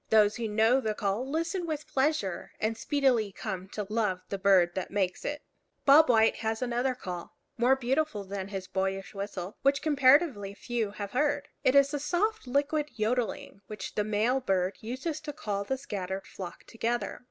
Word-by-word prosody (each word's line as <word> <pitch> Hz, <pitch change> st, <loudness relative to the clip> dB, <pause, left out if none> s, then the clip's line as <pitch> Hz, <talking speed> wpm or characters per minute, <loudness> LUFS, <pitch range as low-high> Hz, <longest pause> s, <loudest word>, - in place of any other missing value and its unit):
Those 215 Hz, -1 st, +5 dB
who 235 Hz, -1 st, -2 dB
know 225 Hz, +5 st, +3 dB
the 215 Hz, -3 st, -1 dB
call 210 Hz, +7 st, -1 dB
listen 335 Hz, +4 st, -1 dB
with 305 Hz, -1 st, -4 dB
pleasure, 275 Hz, -, -1 dB
and 220 Hz, +1 st, 0 dB
speedily 250 Hz, -5 st, +1 dB
come 190 Hz, -2 st, -5 dB
to 210 Hz, +1 st, -5 dB
love 210 Hz, -4 st, 0 dB
the 200 Hz, -, -3 dB
bird 185 Hz, -3 st, +4 dB
that 190 Hz, -, -3 dB
makes 190 Hz, -3 st, -1 dB
it. 295 Hz, 0 st, -4 dB, 0.4 s
Bob 290 Hz, +2 st, +7 dB
White 225 Hz, -2 st, +4 dB
has 220 Hz, 0 st, -2 dB
another 250 Hz, +1 st, 0 dB
call, 180 Hz, -7 st, -7 dB, 0.2 s
more 245 Hz, +3 st, +4 dB
beautiful 265 Hz, -3 st, 0 dB
than 195 Hz, 0 st, -5 dB
his 195 Hz, -2 st, -5 dB
boyish 195 Hz, 0 st, -2 dB
whistle, 195 Hz, -1 st, -5 dB
which 275 Hz, 0 st, +2 dB
comparatively 275 Hz, -, +4 dB
few 230 Hz, 0 st, -2 dB
have 205 Hz, 0 st, -6 dB
heard. 285 Hz, +2 st, 0 dB
It 255 Hz, -, +4 dB
is 280 Hz, +1 st, +5 dB
a 290 Hz, -, 0 dB
soft 365 Hz, +4 st, 0 dB
liquid 290 Hz, +3 st, 0 dB
yodeling, 220 Hz, -3 st, -2 dB
which 215 Hz, -, -6 dB
the 210 Hz, -, 0 dB
male 215 Hz, +5 st, +1 dB
bird 190 Hz, -5 st, 0 dB
uses 260 Hz, +8 st, -4 dB
to 300 Hz, -1 st, -6 dB
call 200 Hz, -5 st, -3 dB
the 265 Hz, +5 st, -1 dB
scattered 195 Hz, -6 st, -5 dB
flock 180 Hz, -3 st, -8 dB
together. 230 Hz, -2 st, -2 dB
225 Hz, 175 wpm, -29 LUFS, 200-275 Hz, 0.4 s, Bob